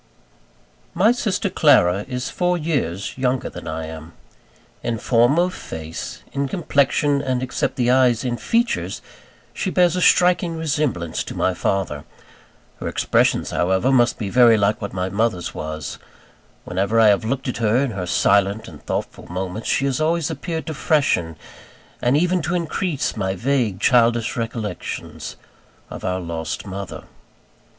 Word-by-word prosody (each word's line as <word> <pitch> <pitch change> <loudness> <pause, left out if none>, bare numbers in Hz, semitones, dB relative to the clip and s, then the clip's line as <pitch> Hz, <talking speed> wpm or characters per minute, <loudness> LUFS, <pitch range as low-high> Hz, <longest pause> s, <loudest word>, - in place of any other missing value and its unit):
My 215 +5 +5
sister 225 -4 -1
Clara 105 - +4
is 125 -1 -3
four 180 0 +1
years 135 - -2
younger 130 0 0
than - - -9
I 80 0 -4
am. 80 +1 -9 0.7
In 115 -1 -2
form 120 +6 +3
of 180 +1 +2
face, 80 - -7
in 140 0 -1
complexion, 145 -2 +1
and 130 -2 -1
except 130 - -2
the 125 -1 +2
eyes 125 -2 +3
in 120 -1 0
features, 235 - -1 0.5
she 190 - -2
bears 180 -2 +3
a 180 - -1
striking 180 -2 +4
resemblance 145 - -1
to - - -7
my 95 - +1
father. 90 -4 -1 0.8
Her - - -4
expressions - - +1
however, 95 +8 +1
must 120 -2 +3
be 100 -4 -4
very 120 -1 +6
like 105 +2 +1
what 100 - -4
my 90 -1 -2
mother's 100 -4 -1
was. 80 0 -5 0.7
Whenever 100 +5 0
I 110 -1 +7
have 100 0 +3
looked 130 +4 -2
at 125 - -2
her 115 0 +2
in 130 - -3
her 95 -4 -4
silent 100 +4 +2
and 80 -5 -12
thoughtful - - -4
moments, 95 +4 -4
she 135 - +2
has 135 +1 0
always 165 0 +1
appeared 160 +2 -4
to 160 - -4
freshen, 140 - +1 0.7
and 125 +4 +3
even 180 +2 +2
to 165 +4 -1
increase, 170 -2 -1
my 95 -3 -1
vague, 115 -2 0
childish 120 -1 +3
recollections 115 -4 -5 0.6
of - - -8
our 90 0 -1
lost 85 -2 -4
mother. 95 -1 -6
120 Hz, 155 wpm, -21 LUFS, 95-150 Hz, 0.8 s, I